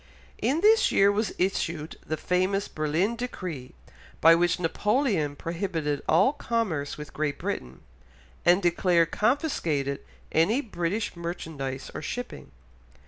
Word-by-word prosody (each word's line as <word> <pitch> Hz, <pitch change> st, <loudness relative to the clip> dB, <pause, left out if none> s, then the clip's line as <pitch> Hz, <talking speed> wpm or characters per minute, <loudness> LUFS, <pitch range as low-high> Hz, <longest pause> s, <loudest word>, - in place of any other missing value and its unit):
In 300 Hz, +5 st, +1 dB
this 440 Hz, +3 st, +5 dB
year 200 Hz, +1 st, +5 dB
was 210 Hz, 0 st, 0 dB
issued 170 Hz, -4 st, -1 dB
the 155 Hz, -, -3 dB
famous 185 Hz, +4 st, 0 dB
Berlin 160 Hz, +9 st, 0 dB
Decree, 180 Hz, -, -6 dB, 0.4 s
by 165 Hz, +1 st, +8 dB
which 175 Hz, +1 st, +2 dB
Napoleon 195 Hz, -, +1 dB
prohibited 165 Hz, -4 st, -2 dB
all 270 Hz, -, +5 dB
commerce 225 Hz, -, -2 dB
with 150 Hz, 0 st, -9 dB
Great 145 Hz, -2 st, -1 dB
Britain, 65 Hz, +1 st, -5 dB, 0.6 s
and 180 Hz, +3 st, +4 dB
declared 175 Hz, -1 st, +3 dB
confiscated 170 Hz, -, 0 dB, 0.3 s
any 195 Hz, -, +3 dB
British 205 Hz, -3 st, -2 dB
merchandise 160 Hz, -6 st, -5 dB
or -, -, -5 dB
shipping. 245 Hz, -, -6 dB
175 Hz, 120 wpm, -27 LUFS, 155-210 Hz, 0.6 s, by